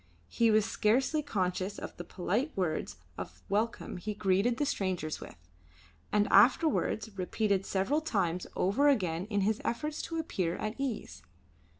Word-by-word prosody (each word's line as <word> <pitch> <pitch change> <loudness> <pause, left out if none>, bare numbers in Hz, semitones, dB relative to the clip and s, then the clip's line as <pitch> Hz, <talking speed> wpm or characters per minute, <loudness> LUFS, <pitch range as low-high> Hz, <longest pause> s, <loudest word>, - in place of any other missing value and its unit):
He 230 -1 +3
was 215 -1 +4
scarcely 260 +9 +2
conscious 190 -6 -2
of - - -7
the 175 - -6
polite 205 - -1
words 175 -5 -1 0.2
of - - -8
welcome 215 -1 -1
he 210 +4 -4
greeted 200 +4 +2
the 290 - +1
strangers 185 - -2
with, - - -9 0.8
and 205 0 +3
afterwards 220 -2 +4
repeated 195 +1 0
several 225 +11 +1
times 185 - -1
over 250 +11 +3
again 180 -9 +1
in 205 -2 0
his 215 +2 +1
efforts 300 +6 -2
to 330 - -4
appear 185 - -1
at 215 +2 -3
ease. 270 -5 -4
210 Hz, 150 wpm, -31 LUFS, 185-245 Hz, 0.8 s, was